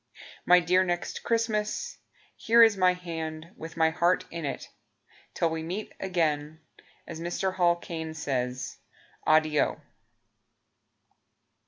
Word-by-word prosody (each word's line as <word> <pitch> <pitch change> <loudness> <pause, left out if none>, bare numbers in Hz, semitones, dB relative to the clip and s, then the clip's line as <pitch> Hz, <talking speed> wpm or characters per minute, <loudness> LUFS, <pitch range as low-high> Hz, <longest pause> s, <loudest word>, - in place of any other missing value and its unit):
My 180 0 +8
dear 180 +2 +3
Next 175 -1 -3
Christmas, 230 - -1 0.4
Here 230 +1 +5
is 225 -2 +5
my 185 -1 +4
hand, 165 -2 -6
With 165 +1 -9
my 160 0 +3
heart 175 +2 +2
in 165 -2 -5
it. 140 - -4 0.7
Till 165 - +1
we 160 0 -3
meet 185 +7 -5
again 160 -5 -1 0.5
As 165 -1 -8
Mr. 180 +2 -2
Hall 175 -2 +3
Caine 160 -2 -6
says 125 -4 -3 0.5
Addio. 155 -1 +3
170 Hz, 120 wpm, -28 LUFS, 160-185 Hz, 0.7 s, My